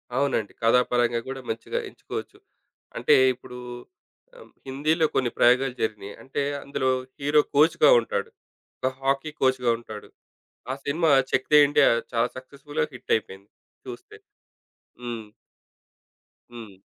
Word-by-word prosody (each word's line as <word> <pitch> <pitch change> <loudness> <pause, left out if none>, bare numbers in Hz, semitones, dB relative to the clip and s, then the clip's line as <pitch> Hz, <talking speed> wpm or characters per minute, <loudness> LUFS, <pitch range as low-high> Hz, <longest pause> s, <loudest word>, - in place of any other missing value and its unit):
అవునండి. 130 -6 0
కథాపరంగా 120 0 +2
గూడా 135 0 -6
మంచిగా 115 0 -3
ఎంచుకోవచ్చు. - - -8 0.6
అంటే - - +4 0.2
ఇప్పుడు 125 0 -12 0.8
ఆహ్, - - -15 0.2
హిందీలో 155 +5 +1
కొన్ని 125 -2 +2
ప్రయోగాలు 125 +1 +3
జరిగినయి. 105 -2 -3
అంటే 135 +2 -4 0.2
అందులో 130 -2 -1 0.3
హీరో 145 +2 +3
కోచ్‌గా 150 0 +5
ఉంటాడు. 100 -3 -3 0.5
ఒక 130 - 0
హాకీ 135 +3 0
కోచ్‌గా 130 -2 +2
ఉంటాడు. 110 -3 -10 0.6
ఆ - - -1
సినిమా 160 +2 +1 0.2
'చెక్‌దే 150 +3 +3
ఇండియా' 145 - +4 0.2
చాలా 115 +1 +1
సక్సస్‌ఫుల్‌గా 140 - -4
హిట్ - - -4
అయిపోయింది. 100 -1 -9 0.4
చూస్తే. - - -10 0.9
హ్మ్. 120 -2 -5 1.3
హ్మ్. 110 -5 -10
130 Hz, 115 wpm, -25 LUFS, 115-140 Hz, 1.3 s, కోచ్‌గా